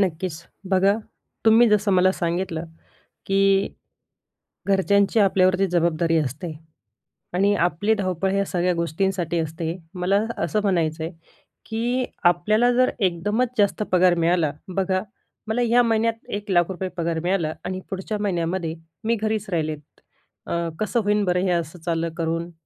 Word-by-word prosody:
नक्कीच. 170 -3 -1 0.3
बघा 195 +2 +4 0.5
तुम्ही 225 +1 +6
जसं 210 -1 +2
मला 185 +1 +4
सांगितलं, 170 -1 -2 0.6
की 195 0 +3 1.0
घरच्यांची 200 +2 +3
आपल्यावरती 190 -1 +3
जबाबदारी 170 -1 +2
असते 155 +4 -3 0.8
आणि 200 +3 +3
आपली 175 +5 +1
धावपळ 190 -1 -1
या 200 0 +1
सगळ्या 180 0 0
गोष्टींसाठी 170 +1 -1
असते. 165 +2 -3 0.2
मला 195 +4 +1 0.2
असं 215 - 0
म्हणायचं 165 -5 0
आहे, 165 - -4 0.5
की 240 +3 -1 0.2
आपल्याला 215 +8 +4
जर 255 +1 +3
एकदमच 205 +6 +1
जास्त 205 0 +2
पगार 180 -1 +5
मिळाला. 165 -3 +2 0.2
बघा, 185 -1 +1 0.5
"मला 230 +3 0
या 240 +1 +4
महिन्यात 225 0 0
₹1,00,000 190 -2 0
पगार 165 -1 -1
मिळाला 175 -4 0
आणि 185 0 -3
पुढच्या 195 +2 -3
महिन्यामध्ये 170 -4 -1 0.3
मी 230 +1 +1
घरीच 215 -1 -1
राहिले." 155 -4 -1 0.7
अ, 170 0 -1
कसं 215 +3 0
होईल 205 0 +2
बरं 180 0 +1
हे 180 - +1
असं 170 0 -2
चाललं 165 0 -1
करून? 165 +1 -2
185 Hz, 130 wpm, -23 LUFS, 170-205 Hz, 1.0 s, तुम्ही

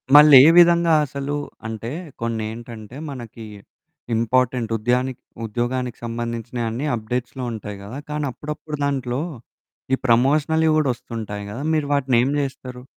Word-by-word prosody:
మళ్ళేవిధంగా 165 +4 +8
అసలూ 140 +1 -4 0.3
అంటే, 110 +1 -5 0.3
కొన్నేంటంటే, 115 +1 -5
మనకీ 120 -4 -8 0.7
ఇంపార్టెంట్ 120 +1 +1
ఉద్యానికి 125 +3 0 0.2
ఉద్యోగానికి 120 +2 -2
సంబంధించినయన్నీ 115 +1 -3
అప్డేట్స్‌లో 125 +3 -4
ఉంటాయి 105 -2 -6
గదా! 110 +7 -7
కానీ, 150 0 -1
అప్పుడప్పుడు 150 +3 -6
దాంట్లో 130 -2 -1 0.7
ఈ - - +7
ప్రమోషనల్‌వి 150 +6 +3
గూడా 150 -3 +2
ఒస్తుంటాయి 110 -4 -6
గదా! 125 +7 -5
మీరు 155 -2 +1
వాటినేం 130 -3 +2
జేస్తరు? 130 -3 -5
125 Hz, 105 wpm, -22 LUFS, 115-140 Hz, 0.7 s, మళ్ళేవిధంగా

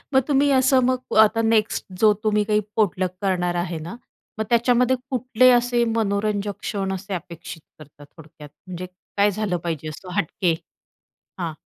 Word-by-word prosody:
मग 265 - +6
तुम्ही 285 0 +3
असं 260 0 +4
मग 255 -2 -1
आता 225 +1 +2
नेक्स्ट 225 -1 +1 0.2
जो 215 -1 +6
तुम्ही 210 -1 +2
काही 210 0 +2 0.2
पोटलक 185 -4 +1
करणार 180 -2 0
आहे 175 -1 -2
ना? 170 +8 -8 0.4
मग 220 - 0
त्याच्यामध्ये 245 +2 +3
कुठले 255 -1 +3
असे 240 0 +1
मनोरंजक 205 -1 -1
क्षण 195 -2 -3
असे 195 +1 -5
अपेक्षित 170 -1 -8 0.2
करता 145 -1 -15
थोडक्यात, 150 0 -15 0.2
म्हणजे 185 0 -6 0.3
काय 205 +1 +4
झालं 205 -2 -2
पाहिजे 165 -3 -4
असं 180 +4 -9
हटके? 180 -2 0 0.9
हां. 170 -3 -3
205 Hz, 155 wpm, -22 LUFS, 175-230 Hz, 0.9 s, मग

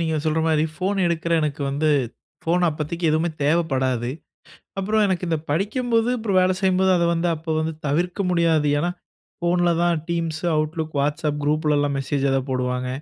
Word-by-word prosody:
நீங்க 160 -1 0
சொல்ற 155 0 +1
மாதிரி 155 -1 +2
ஃபோன் 190 +4 -1
எடுக்குற 170 0 -1
எனக்கு 150 -1 -2
வந்து 145 +3 0 0.6
ஃபோன் 175 +2 +1
அப்பதிக்கி 160 +2 -4
எதுவுமே 160 +2 +1
தேவைப்படாது. 135 -6 +1 0.7
அப்புறம் 215 +3 +2
எனக்கு 185 -1 -1
இந்த 160 - +1
படிக்கும்போது 225 - +1
அப்புறம் 215 -4 0
வேலை 185 0 +3
செய்யும்போது 190 -1 +3
அத 170 - +2
வந்து 170 +1 0
அப்போ 160 +1 -5
வந்து 160 +1 -2
தவிர்க்க 175 +7 0
முடியாது. 165 -4 +2
ஏனா, 175 +4 0 0.5
ஃபோன்ல 175 0 +2
தான் 175 -1 +2
Teams, 165 -2 -1 0.2
Outlook, 155 +1 -2
WhatsApp 150 +1 -1
குரூப்ளெல்லாம் 150 -1 +1
மெசேஜ் 135 +1 -1
எதா 135 0 +2
போடுவாங்க. 125 0 -1
160 Hz, 155 wpm, -22 LUFS, 150-175 Hz, 0.7 s, வேலை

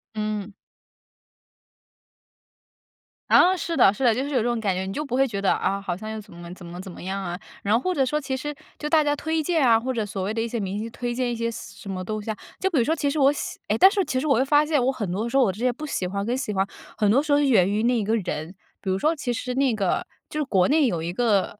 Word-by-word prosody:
嗯。 210 -1 -3 2.8
啊， 370 +2 +6
是 335 -2 -3
的， 195 - +6
是 265 - -5
的， 240 - +6
就 260 - -1
是 285 - -4
有 265 - +1
这 - - +3
种 240 -1 0
感 200 -4 0
觉， 190 +1 -3
你 - - -4
就 300 +9 -3
不 250 - -3
会 270 +1 +3
觉 200 -4 -4
得： 195 - +2
“啊， 195 - -1
好 190 -3 -3
像 215 +4 -7
又 220 - -4
怎 205 -4 -13
么 170 0 -10
怎 180 - -12
么 175 +2 -8
怎 190 - -9
么 - - -11
样 195 +1 -3
啊。” 175 -1 -4 0.2
然 200 - -2
后 - - +3
或 365 +8 -1
者 275 - +2
说 300 +4 0
其 270 -2 -3
实 295 +3 -4 0.3
就 300 - -3
大 310 -1 +5
家 290 0 +1
推 320 +2 -1
荐 325 -2 +1
啊， 230 -3 +5
或 260 +3 -2
者 225 -3 -1
所 195 -2 -4
谓 205 +3 -2
的 225 - -1
一 230 - -1
些 235 0 -3
明 195 +1 -3
星 225 +2 -4
推 240 +1 -4
荐 245 0 -1
一 - - -2
些 230 0 -1
什 - - -9
什 195 - -6
么 185 -1 -4
东 215 +3 -3
西 215 +1 -4
啊， - - -4 0.2
就 380 - +1
比 305 - +2
如 235 - +4
说 315 +5 +1
其 290 - -1
实 290 +2 0
我 275 0 +6
喜 - - -5
诶， - - +1
但 380 - +8
是 400 -2 +1
其 260 -5 -1
实 275 - -3
我 275 -4 +3
又 - - +4
发 295 +2 +4
现 295 -5 +1
我 265 - +3
很 210 -9 -4
多 215 +6 -2
时 270 - +1
候 265 - +6
我 200 - +2
这 195 - -11
些 250 0 +2
不 300 +6 -7
喜 190 -11 -2
欢 200 +2 -3
跟 240 +3 0
喜 260 -5 -3
欢， 190 +1 +2 0.3
很 210 -2 +3
多 270 +5 +4
时 300 -1 -3
候 285 - +6
是 290 - +3
源 195 -8 +4
于 210 +2 0
那 240 -1 +2
一 - - -1
个 220 +3 +1
人。 175 -3 -4 0.3
比 195 - -4
如 185 - +1
说 310 +11 +1
其 270 -5 -3
实 250 +1 -3
那 265 -2 +2
个 195 -4 0 0.2
就 305 - -4
是 - - +1
国 190 -8 +3
内 295 -2 +4
有 170 -6 -2
一 170 +1 -3
个， 210 -3 +1
230 Hz, 330 characters per minute, -24 LUFS, 200-275 Hz, 2.8 s, 但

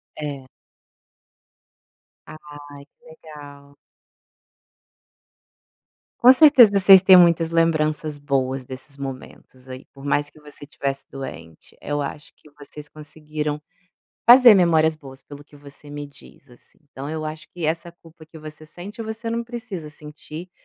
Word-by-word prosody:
É. 140 -3 -7 1.8
Ai, - - -11 0.6
que - - -33
legal. 145 -3 -15 2.4
Com 250 +2 +8
certeza, 250 -9 +6
vocês 190 -1 +7
têm 190 -1 +7
muitas 170 -2 +4
lembranças 155 -2 0
boas 135 -2 -3
desses 135 +2 -11
momentos, 130 -1 -10
aí, 130 0 -10
por 135 0 -15
mais 145 +1 -1
que 155 - -21
você 150 -1 -11
estivesse 140 -1 -5
doente, 85 - -11
eu 145 0 -4
acho 145 +2 -8
que 150 - -22
vocês 150 +1 -12
conseguiram 150 -1 -6 0.7
fazer 245 -2 +9
memórias 160 -3 +2
boas 135 -3 -14
pelo 145 0 -13
que 145 0 -20
você 145 +1 -15
me 145 0 -8
diz, 140 -2 -19
assim. 120 - -20
Então, 140 +2 -8
eu 155 0 -5
acho 155 +1 -8
que 175 -3 -8
essa 165 +2 -3
culpa 165 -2 -19
que 160 0 -14
você 155 0 -12
sente, 195 +8 -11
você 220 +1 -6
não 235 0 -2
precisa 230 -9 -8
sentir, 150 +3 -11
150 Hz, 135 wpm, -21 LUFS, 140-170 Hz, 2.4 s, fazer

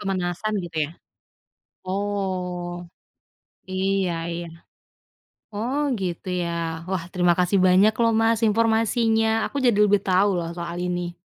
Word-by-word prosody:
Pemanasan 195 +2 -2
gitu, 165 -2 -9
ya? - - -12 0.9
Oh. 185 -3 -3 0.8
Iya 190 -1 0 0.2
iya. 170 0 -5 1.1
Oh, 240 +7 -2 0.2
gitu 180 0 -4
,ya? 170 - -2 0.4
Wah, 185 -3 -2
terima 175 -2 +3
kasih 180 +2 +3
banyak 185 +4 +5
loh, 230 0 +4
Mas, 225 0 +2
informasinya. 225 0 +2 0.2
Aku - - -5
jadi 240 -5 +3
lebih 205 -1 +3
tahu 195 +1 +3
loh 165 -1 -4
soal 170 0 -5
ini. 175 -1 -2
190 Hz, 120 wpm, -24 LUFS, 175-215 Hz, 1.1 s, banyak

